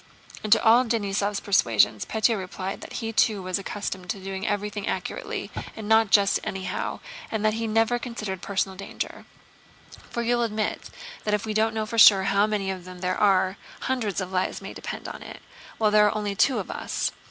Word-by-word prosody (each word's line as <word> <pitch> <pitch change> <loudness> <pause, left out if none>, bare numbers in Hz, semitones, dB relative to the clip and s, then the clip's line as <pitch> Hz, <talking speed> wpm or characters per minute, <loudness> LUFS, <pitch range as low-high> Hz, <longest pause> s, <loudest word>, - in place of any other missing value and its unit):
And 215 - -4
to - - +6
all 235 +2 +6
Denísov's 205 -3 -1
persuasions, 115 - +3
Pétya 220 +1 +2
replied 190 0 -5
that - - -9
he 225 - -3
too 210 -3 +2
was 185 +1 -1
accustomed 190 -2 -5
to 200 - -2
do 190 0 -5
everything 205 -1 -2
accurately - - -4 0.2
and 220 -2 -7
not 220 -1 +4
just 200 0 +4
anyhow, 190 -1 -4 0.3
and 215 -1 -2
that 215 - +3
he 225 +1 -2
never 225 +2 +2
considered 215 -7 -5
personal 190 -1 -1
danger. 200 - -6 0.8
"For 235 - -3
you'll 240 +1 +1
admit 220 -2 -2 0.3
that 210 -1 +1
if 210 - -4
we 215 - -2
don't 220 +1 +1
know 220 -1 -1
for 230 +1 -2
sure 195 -3 +9
how 200 +2 +3
many 200 -3 -1
of 185 -2 -6
them 180 0 -11
there 185 0 0
are... 190 -2 +3 0.2
hundreds 235 -8 -1
of 185 -1 -4
lives 185 0 -1
may - - -8
depend - - -6
on - - -8
it, - - -9 0.4
while 215 -1 +2
there 210 0 +6
are 210 - 0
only 205 -1 -2
two 255 +7 +3
of - - -4
us. - - -2
205 Hz, 200 wpm, -25 LUFS, 190-220 Hz, 0.8 s, sure